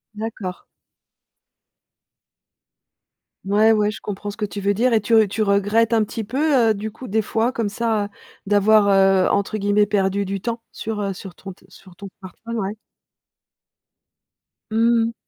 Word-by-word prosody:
D'accord. 210 -4 -6 2.8
Ouais, 210 +3 +4
ouais, 210 -1 +1
je 200 - -9
comprends 205 +1 -6
ce 205 - -13
que 215 - -1
tu 200 0 -7
veux 200 +1 +1
dire 240 +4 +1
et 220 - +3
tu 230 - -2
r 215 - +1
tu 220 - -3
regrettes 205 +3 +2
un 225 -2 +3
petit 225 +2 -5
peu, 260 +1 +2
heu, - - +4
du 215 +1 -5
coup, 240 +3 -10
des 220 +3 +1
fois, 225 +3 0
comme 230 -4 -2
ça, 220 0 -1
heu, - - -6 0.4
d'avoir, 205 +1 +4
heu, 195 -1 +4
entre 200 +2 0
guillemets 205 0 +2
«perdu 200 -1 0
du 195 0 -4
temps» 230 +4 -4
sur, 220 -1 -5
heu, 200 -1 -2
sur 185 -1 -10
ton 195 - -9
te 180 - -18
sur 185 0 -17
ton 200 - -9
smartphone, 230 +5 -8
ouais? 205 0 -3 1.9
Mmh 230 +1 +3
mh. 230 - -6
210 Hz, 175 wpm, -21 LUFS, 200-225 Hz, 2.8 s, Ouais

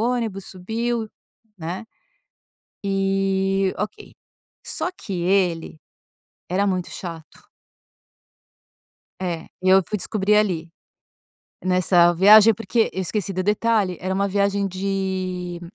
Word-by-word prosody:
ônibus, 205 -5 -3
subiu, 225 +5 -3 0.5
né, 175 +5 -5 1.0
e 195 0 +1
ok. 415 - -5 0.5
Só 360 - -3
que 195 - -6
ele 175 -4 0 0.7
era 195 +3 +1
muito 185 -2 -1
chato. 165 -3 -9 1.7
É, 170 -3 -3
e 185 - -1
eu 190 0 +6
fui 210 - -2
descobrir 210 +1 +1
ali 175 -6 0 1.0
nessa 180 -1 +4
viagem, 210 +5 +8
porque 220 +1 0
eu 190 - -3
esqueci 195 +1 -2
do 185 0 -1
detalhe: 210 -2 +1
era 185 +1 -2
uma 200 +1 +1
viagem 200 0 +1
de 185 -2 -3
195 Hz, 105 wpm, -22 LUFS, 180-205 Hz, 1.7 s, viagem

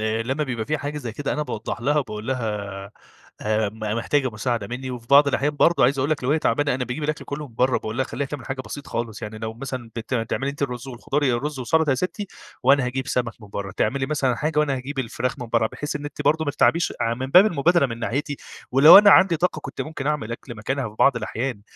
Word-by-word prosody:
لمّا 115 +7 -1
بيبقى 120 -5 -4
في 155 0 -1
حاجة 145 +1 -4
زي 120 -6 -5
كده، 140 +4 -3
أنا 150 - -1
باوضح 115 -3 -5
لها 145 +5 +2
وباقول 110 -5 -4
لها: 130 -3 -1 0.9
"آآ، 110 -1 +1
م 110 +2 -12 0.2
محتاجة 130 +3 0
مساعدة 115 -1 -2
مني؟" 130 +3 -5
وفي 120 -2 -7
بعض 140 +2 +6
الأحيان 145 +2 0
برضه 170 +3 +4
عايز 135 +2 +2
أقول 135 +3 0
لك 150 -4 -1
لو 130 - +1
هي 155 - +3
تعبانة 145 0 +1
أنا 125 0 -2
باجيب 125 +5 -5
الأكل 155 0 -2
كله 145 0 -6
من 115 - -20
برّا. 125 +1 +2
وباقول 110 +1 -5
لها 130 - +2
اخليها 140 0 -4 0.2
حاجة 135 0 -4
بسيط 140 +2 -8
خالص. 115 -2 -4
يعني 105 +1 -6
لو 110 0 -5
مثلًا 125 -2 -6
بت 115 +3 -4
بتعملي 125 +4 -1
أنتِ 140 0 -7
الرز 125 -1 -3
والخضار، 135 +4 -2
يا 130 -4 +3
الرز 145 +3 -3
وسلطة 155 +4 +2
يا - - +3
ستي 185 - -3 0.4
وأنا 135 +1 +4
هاجيب 130 +2 -3
سمك 120 -4 -1
من 105 - -12
برّا. 100 -1 -5
تعملي 135 +8 0
مثلًا 135 -5 0
حاجة 150 +2 -1
وأنا 150 -2 +2
هاجيب 135 +2 -6
الفراخ 125 +2 -2
من 125 - -5
برّا، 115 -1 +2
بحيث 150 +6 -5
إن 145 - -8
أنتِ 145 - -6
برضه 160 +1 +2
ما 145 - 0
تتعبيش، 165 +4 +2
ع 115 0 +1
من 130 +2 -4
باب 180 +9 +7
المبادرة 170 -3 +3
من 115 -2 -6
ناحيتي 145 +5 -2 0.4
ولو 145 +8 +10
أنا 205 0 +7
عندي 185 -4 +6
طاقة 160 -1 0
كنت 135 - -7
ممكن 155 -3 -5
أعمل 145 -7 -1
أكل 120 +1 -8
مكانها 130 +4 -2
في 105 - -15
بعض 135 -3 +5
الأحيان. 115 0 -3
130 Hz, 245 wpm, -23 LUFS, 115-145 Hz, 0.9 s, ولو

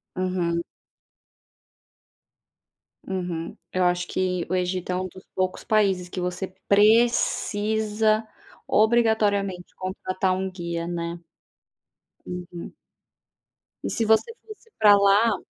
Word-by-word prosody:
Uhum. 180 -2 -1 2.4
Uhum 175 -3 -4 0.2
Eu 185 - +1
acho 180 0 +1
que 180 -2 -1
o 185 - 0
Egito 180 0 -1
é 180 - 0
um 185 0 -2
dos 185 +1 -14
poucos 185 -1 -1
países 195 -5 +1
que 185 - -5
você 180 +1 -3 0.2
precisa, 215 0 +2 0.4
obrigatoriamente, 210 -5 +2
contratar 185 0 -2
um 190 +1 -2
guia, 170 -2 -4
né. 170 0 -4 1.1
Uhum. 175 -1 -7 1.1
E - - -2
se 230 - -1
você 220 - +3
fosse 435 +1 -13
pra 205 -1 +8
lá 200 +3 +4
185 Hz, 105 wpm, -24 LUFS, 180-215 Hz, 2.4 s, pra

